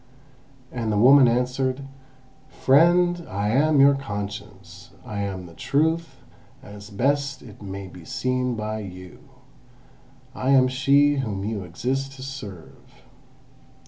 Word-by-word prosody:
And 115 -3 -3
the 105 - 0
woman 130 +4 +7
answered: 125 +2 0 0.7
"Friend, 175 +5 +3
I 100 +2 -2
am 145 +5 +3
your 140 +1 +7
Conscience; 100 -6 -7 0.2
I 105 -2 -5
am 95 -2 -4
the 85 - -13
Truth 160 - -1 0.4
as 100 0 -11
best 140 +6 -1
it 110 -5 -14
may 100 -1 -7
be 90 -1 -13
seen 125 +6 -1
by 110 0 -4
you. 90 -3 -10 1.1
I 130 0 -3
am 130 -1 +5
she 140 +3 +3
whom 105 -7 -3
you 105 -2 -3
exist 130 +10 -3
to 130 -1 -10
serve." 105 -11 -10
125 Hz, 125 wpm, -24 LUFS, 100-135 Hz, 1.1 s, woman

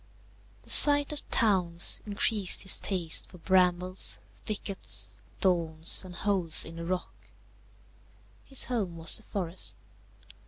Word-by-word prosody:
The - - 0
sight 290 -1 +8
of 295 - -3
towns 180 -7 0
increased 205 -1 0
his 195 - +4
taste 175 -5 +1
for 180 - -18
brambles, 180 +1 -1
thickets, 205 -2 -7 0.2
thorns, 165 -3 -1
and 180 -1 -12
holes 185 -5 +3
in 165 +1 -12
the 170 - -9
rock. 185 +1 -8 1.2
His 270 - +1
home 200 -9 -6
was 165 0 +1
the - - -8
forest. 185 -4 -7
185 Hz, 120 wpm, -26 LUFS, 170-205 Hz, 1.2 s, sight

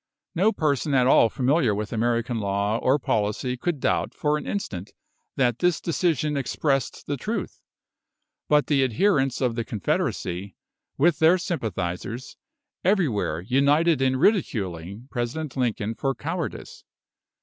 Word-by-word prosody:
No 200 +6 +3
person 145 - 0
at 125 -1 +4
all 115 -3 +5
familiar 130 -2 +2
with 105 +2 -4
American 115 +1 0
law 100 +2 0
or 130 +3 +3
policy 110 0 -1
could 160 +3 -2
doubt - - 0
for 150 0 +1
an 150 - -4
instant 100 - -4 0.4
that 120 -3 +1
this 180 -1 +2
decision 155 -4 0
expressed 135 -1 -1
the 145 - -2
truth; 210 - -4 0.9
but 150 -1 +4
the 140 -3 +2
adherents 135 - +1
of 125 -3 +1
the 115 0 -2
Confederacy, 95 -2 -2 0.4
with 165 +2 +3
their 160 +3 +6
sympathisers, 115 - -4 0.5
everywhere 140 - +1
united 140 - +3
in 130 0 +2
ridiculing 105 - 0
President 130 +4 -3
Lincoln 115 -4 -1
for 135 +3 -2
cowardice. 165 +1 -5
130 Hz, 130 wpm, -25 LUFS, 110-155 Hz, 0.9 s, their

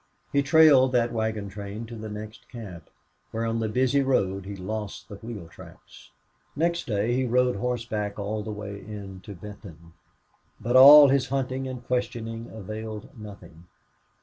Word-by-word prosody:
He 140 - +4
trailed 140 -3 +6
that 120 -1 +2
wagon 110 -2 -2
train 100 +3 -7
to 115 +1 -9
the 110 -1 -7
next 105 +1 -9
camp, 95 - -10 0.4
where 115 +1 -3
on 115 0 -1
the 110 -1 -1
busy 130 +5 +2
road 100 -8 0
he 100 - -6
lost 95 -2 -6
the 100 - -9
wheel 110 -5 -8
tracks. - - -15 0.5
Next 170 +2 0
day 110 +1 0
he 130 - +1
rode 125 -1 +2
horseback 110 -3 -3
all 105 +1 -3
the 105 - -7
way 100 -1 -7
in 100 -3 -9
to 100 - -8
Benton. 85 -4 -12 0.7
But 120 +2 -2
all 140 +2 +10
his 135 -1 +2
hunting 135 0 -2
and 125 -2 -7
questioning 115 -2 -3
availed 110 0 -8
nothing. 100 -6 -12
110 Hz, 160 wpm, -26 LUFS, 100-125 Hz, 0.7 s, all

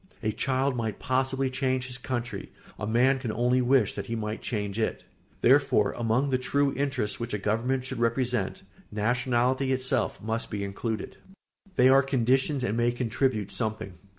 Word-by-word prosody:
A 110 - +1
child 130 +3 0
might 110 -4 -2
possibly 130 0 0
change 130 -1 0
his 125 -1 -4
country; 120 -5 -4 0.3
a 105 - -3
man 125 +4 +3
can 120 -4 -3
only 125 +3 +2
wish 125 -4 +3
that - - -5
he 115 - -2
might 110 0 -4
change 105 -2 -3
it. 110 - -1 0.4
Therefore, 130 -5 +4
among 120 +4 +1
the 130 - +2
true 140 +2 +1
interests 130 -6 -1
which 115 -2 -3
a - - 0
government 115 +6 0
should 130 -2 -5
represent, 120 -4 0 0.3
nationality 125 +4 +1
itself 130 -1 0
must 110 +2 -3
be 100 -2 -3
included. 105 +3 -3
[Sidenote: 195 0 -27
They 130 -2 +6
are 135 +1 +7
conditions 135 +1 +1
and 105 - 0
may 120 +1 +2
contribute 120 -3 -1
something. 110 -4 -3
125 Hz, 170 wpm, -27 LUFS, 110-130 Hz, 0.4 s, are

